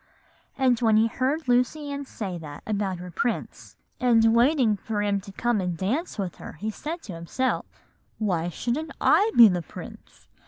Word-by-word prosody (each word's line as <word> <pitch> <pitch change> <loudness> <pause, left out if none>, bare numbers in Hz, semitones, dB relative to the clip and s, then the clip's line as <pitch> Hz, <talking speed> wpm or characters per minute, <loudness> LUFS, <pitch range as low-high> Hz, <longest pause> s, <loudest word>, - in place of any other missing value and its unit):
"And 255 -3 +3
when 220 -2 +4
he 220 - +5
heard 265 +7 -1
Lucy 250 +4 +1
Ann 280 0 -4
say 190 -8 -5
that 145 -2 -9
about 200 -3 -1
her 180 0 -8
prince, 235 +7 -3 0.2
and 225 -3 +4
waiting 240 -2 +4
for 205 +1 -3
him 200 -1 0
to 195 0 -11
come 235 +1 0
and 180 -2 -2
dance 245 - -2
with 190 -4 -4
her, - - -9
he 215 +8 -4
said 320 +9 -6
to 195 - -8
himself, 170 +10 -2 0.5
"'Why 175 -6 0
shouldn't 275 - -3
I 405 +7 +4
be 235 -2 +11
the 180 -3 0
prince? 165 - -12
225 Hz, 175 wpm, -25 LUFS, 190-260 Hz, 0.5 s, be